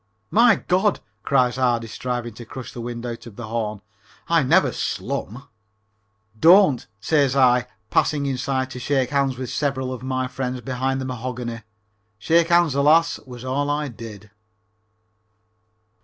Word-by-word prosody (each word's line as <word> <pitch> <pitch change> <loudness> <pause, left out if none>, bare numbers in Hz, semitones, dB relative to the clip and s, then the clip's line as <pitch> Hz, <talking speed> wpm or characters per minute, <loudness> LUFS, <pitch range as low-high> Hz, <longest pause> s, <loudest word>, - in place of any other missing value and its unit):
"My 230 0 +6
God!" 190 +3 +1 0.2
cries 125 0 +1
Ardy, 120 -3 +1
striving 120 +1 -4
to 120 - -10
crush 125 +2 -9
the 120 - -7
wind 120 0 -6
out 120 0 -6
of 110 - -12
the 115 -1 -8
horn, 110 -3 -3 0.5
"I 165 -1 +3
never 130 - +3
slum." 125 +8 -4 0.9
"Don't," 170 - +6
says 140 +2 +2
I, 125 -2 +4 0.2
passing 145 -2 +2
inside 135 -1 -1
to 125 - -7
shake 130 0 0
hands 140 -2 +1
with 130 -1 -5
several 130 -3 -1
of 125 - -7
my 130 0 -2
friends 125 0 -4
behind 130 +1 -2
the - - -4
mahogany. 125 -2 -5 0.6
Shake 165 +9 +3
hands, 170 -4 +4
alas, 155 +4 +3
was 125 -1 -9
all 140 +3 -1
I 145 0 -1
did. 105 -3 -10
130 Hz, 145 wpm, -22 LUFS, 120-140 Hz, 0.9 s, My